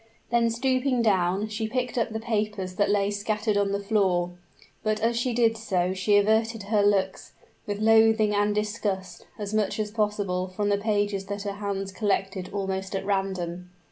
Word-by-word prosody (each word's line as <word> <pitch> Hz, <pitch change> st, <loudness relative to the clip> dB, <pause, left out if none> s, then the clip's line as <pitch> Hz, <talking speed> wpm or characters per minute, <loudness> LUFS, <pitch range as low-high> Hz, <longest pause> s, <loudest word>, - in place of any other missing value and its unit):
Then 235 Hz, -1 st, +3 dB
stooping 255 Hz, +1 st, +1 dB
down, 190 Hz, -1 st, +2 dB
she 220 Hz, +1 st, -2 dB
picked 250 Hz, +2 st, -2 dB
up 230 Hz, -2 st, +1 dB
the 220 Hz, 0 st, -4 dB
papers 210 Hz, -4 st, -2 dB
that 205 Hz, -, +2 dB
lay 205 Hz, 0 st, +2 dB
scattered 210 Hz, +1 st, -1 dB
on 200 Hz, -1 st, +1 dB
the 200 Hz, -, 0 dB
floor: 195 Hz, -4 st, +1 dB, 0.5 s
but 215 Hz, 0 st, 0 dB
as 230 Hz, +2 st, +1 dB
she 245 Hz, +2 st, 0 dB
did 230 Hz, -1 st, +3 dB
so 185 Hz, -5 st, 0 dB
she 205 Hz, +2 st, +3 dB
averted 220 Hz, +1 st, +2 dB
her 205 Hz, +1 st, +2 dB
looks, 195 Hz, -2 st, +1 dB, 0.3 s
with 205 Hz, -1 st, -2 dB
loathing 220 Hz, -1 st, +4 dB
and 205 Hz, 0 st, +1 dB
disgust, 205 Hz, -4 st, -3 dB
as 205 Hz, 0 st, -5 dB
much 215 Hz, 0 st, 0 dB
as 210 Hz, -1 st, -2 dB
possible 205 Hz, -4 st, -1 dB
from 205 Hz, +2 st, -2 dB
the 200 Hz, 0 st, +2 dB
pages 205 Hz, -2 st, 0 dB
that 200 Hz, 0 st, -4 dB
her 200 Hz, -, -2 dB
hands 200 Hz, -1 st, -3 dB
collected 195 Hz, -2 st, -1 dB
almost 190 Hz, -1 st, -3 dB
at 195 Hz, -, -3 dB
random. 185 Hz, -3 st, -2 dB
205 Hz, 175 wpm, -26 LUFS, 195-220 Hz, 0.5 s, loathing